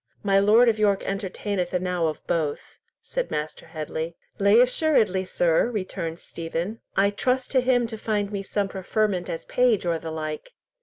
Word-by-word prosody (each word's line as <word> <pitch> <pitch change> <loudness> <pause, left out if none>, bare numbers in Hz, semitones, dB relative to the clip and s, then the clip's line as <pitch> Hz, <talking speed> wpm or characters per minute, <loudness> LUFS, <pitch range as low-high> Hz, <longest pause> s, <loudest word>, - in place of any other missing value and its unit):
My 195 -1 +4
Lord 215 +5 +6
of 220 -2 +2
York 200 -2 +2
entertaineth 195 -1 -2
enow 180 -2 0
of 155 - -5
both," 155 -4 -2 0.3
said - - -3
Master 150 +2 -4
Headley. 160 +1 -5 0.2
"Lay 200 +3 +6
assuredly, 245 - +3
sir," 175 +4 +2
returned 185 -6 -4
Stephen; 170 +6 -5 0.2
"I 200 +1 +4
trust 255 +5 0
to 260 - +4
him 250 -1 +2
to 225 -1 -6
find 210 -2 -1
me 200 -1 -2
some 200 0 -1
preferment 195 -1 -1
as 165 - -5
page 245 -7 +2
or 170 -1 0
the 165 - -6
like." 155 - -5
195 Hz, 165 wpm, -25 LUFS, 170-220 Hz, 0.3 s, Lord